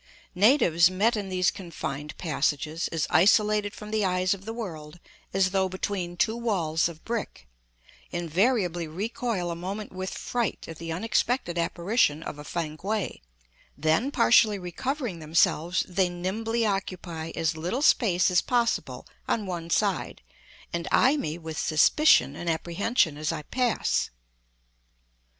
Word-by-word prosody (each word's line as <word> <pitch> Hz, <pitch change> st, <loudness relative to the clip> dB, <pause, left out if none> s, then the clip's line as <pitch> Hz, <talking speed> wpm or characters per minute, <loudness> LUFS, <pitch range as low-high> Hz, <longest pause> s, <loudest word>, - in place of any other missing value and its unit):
Natives 180 Hz, -, +5 dB
met 205 Hz, +6 st, +2 dB
in 205 Hz, -2 st, -4 dB
these 185 Hz, -1 st, +2 dB
confined 150 Hz, -6 st, -6 dB
passages, 155 Hz, 0 st, -1 dB
as 165 Hz, -3 st, -1 dB
isolated 210 Hz, +2 st, +4 dB
from 210 Hz, 0 st, -9 dB
the 215 Hz, -1 st, +1 dB
eyes 185 Hz, 0 st, +1 dB
of 195 Hz, 0 st, -9 dB
the 225 Hz, -, -4 dB
world 175 Hz, -8 st, -7 dB, 0.3 s
as 190 Hz, -1 st, +2 dB
though 190 Hz, -1 st, +1 dB
between 185 Hz, -2 st, -3 dB
two 220 Hz, +5 st, +1 dB
walls 175 Hz, -9 st, 0 dB
of 160 Hz, -2 st, -13 dB
brick, 225 Hz, -, -4 dB, 0.6 s
invariably 175 Hz, -, 0 dB
recoil 195 Hz, +1 st, -3 dB
a -, -, -3 dB
moment 195 Hz, +5 st, -5 dB
with 185 Hz, 0 st, -4 dB
fright 240 Hz, -3 st, -3 dB
at 165 Hz, -1 st, -9 dB
the 165 Hz, 0 st, -5 dB
unexpected 220 Hz, +1 st, 0 dB
apparition 170 Hz, -2 st, +1 dB
of 145 Hz, -, -7 dB
a -, -, -7 dB
Fankwae; 170 Hz, +7 st, -3 dB, 0.6 s
then 160 Hz, -, +2 dB
partially 230 Hz, -5 st, +4 dB
recovering 215 Hz, -, -4 dB
themselves, 165 Hz, +2 st, +1 dB
they 185 Hz, 0 st, +1 dB
nimbly 220 Hz, +6 st, -2 dB
occupy 180 Hz, -5 st, -3 dB
as 165 Hz, -1 st, 0 dB
little 180 Hz, -, -2 dB
space 185 Hz, -, +4 dB
as 180 Hz, -, +4 dB
possible 240 Hz, -2 st, -1 dB, 0.2 s
on 215 Hz, -, 0 dB
one 170 Hz, -3 st, -5 dB
side, -, -, 0 dB, 0.5 s
and 170 Hz, +1 st, -3 dB
eye 265 Hz, +4 st, +5 dB
me 155 Hz, -, -3 dB
with 160 Hz, -2 st, -6 dB
suspicion 235 Hz, -, +4 dB
and 175 Hz, -, -4 dB
apprehension 170 Hz, -, 0 dB
as 155 Hz, +2 st, -1 dB
I 155 Hz, -2 st, -5 dB
pass. 245 Hz, -, 0 dB
185 Hz, 140 wpm, -27 LUFS, 165-215 Hz, 0.6 s, Natives